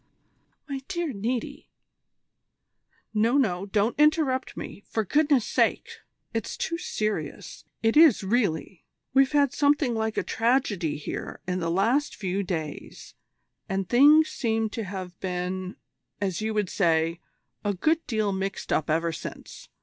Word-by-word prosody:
"My 275 -2 -4
dear 345 -6 -2
Niti 230 +4 -4 0.7
" - - -56 0.7
"No, 225 +5 +3
no, 195 -7 +1
don't 210 +3 +1
interrupt 300 -4 +2
me, - - -7
for 220 -1 -1
goodness' 290 - +3
sake. - - +1 0.4
It's 225 -2 -3
too 335 +1 -2
serious. 205 - -4 0.2
It 225 0 +3
is 310 -8 +6
really. 190 -5 -1 0.3
We've 270 0 +4
had 285 -2 +3
something 285 -3 +2
like 220 -1 -2
a - - +1
tragedy 220 - 0
here 145 - -6
in 185 0 -1
the 165 -1 -1
last 230 - +1
few 195 -1 -2
days, 160 -6 -6 0.6
and 195 -1 -1
things 295 - +6
seem 225 -3 -1
to 225 -1 -4
have 185 -2 -7
been, 185 0 -3 0.4
as 190 -2 -2
you 220 0 -2
would 205 -4 0
say, 165 -2 +1 0.4
a 205 -1 0
good 320 - +1
deal 215 -3 0
mixed 195 0 -3
up 155 - 0
ever 165 +2 +1
since. - - -9
215 Hz, 140 wpm, -26 LUFS, 185-260 Hz, 0.7 s, is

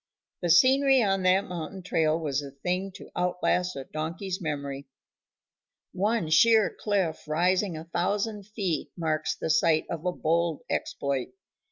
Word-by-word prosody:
The 175 - -1
scenery 265 +8 +5
on 195 -2 +1
that 185 +1 +4
mountain 180 +1 -6
trail 160 -3 +1
was 145 -3 -1
a 140 - -7
thing 180 +8 -3
to - - -11
out 180 0 0
last 180 0 +1
a 135 - -5
donkey's 180 +7 -4
memory. 140 -3 -4 1.1
One 200 -3 0
sheer 220 +5 +5
cliff 190 -8 -1
rising 180 +3 +1
a 155 - -7
thousand 200 +5 -2
feet 200 -6 -2
marks 155 -2 -1
the 160 - -2
site 155 0 +3
of 165 -2 -4
a 180 - 0
bold 170 -1 0
exploit. 140 - -2
175 Hz, 150 wpm, -27 LUFS, 155-195 Hz, 1.1 s, scenery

